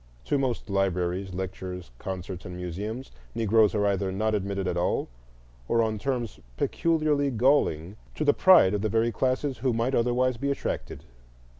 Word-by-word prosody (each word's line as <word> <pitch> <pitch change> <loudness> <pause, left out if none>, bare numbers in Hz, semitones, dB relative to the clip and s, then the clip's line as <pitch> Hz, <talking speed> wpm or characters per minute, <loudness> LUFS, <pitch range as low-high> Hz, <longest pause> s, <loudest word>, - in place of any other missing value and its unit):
To 145 - +1
most 130 -4 -2
libraries, 95 -1 -1
lectures, 90 -4 -6
concerts, 95 -1 -6
and 90 -2 -7
museums, 100 +8 -5 0.2
Negroes 110 -1 +3
are 105 -1 +2
either 100 -1 0
not 110 +3 0
admitted 100 -2 -2
at 90 - -1
all, 90 0 0 0.6
or 115 0 +3
on 110 -1 -1
terms 125 -3 -3 0.2
peculiarly 155 - +1
galling 110 - +1 0.2
to 155 - -2
the 145 - +5
pride 180 - +6
of 105 - 0
the 110 - 0
very 115 +3 +2
classes 130 +2 -1
who 130 0 +1
might 115 +4 0
otherwise 125 +1 +1
be 140 +4 -2
attracted. 140 - -3
110 Hz, 160 wpm, -27 LUFS, 95-130 Hz, 0.6 s, pride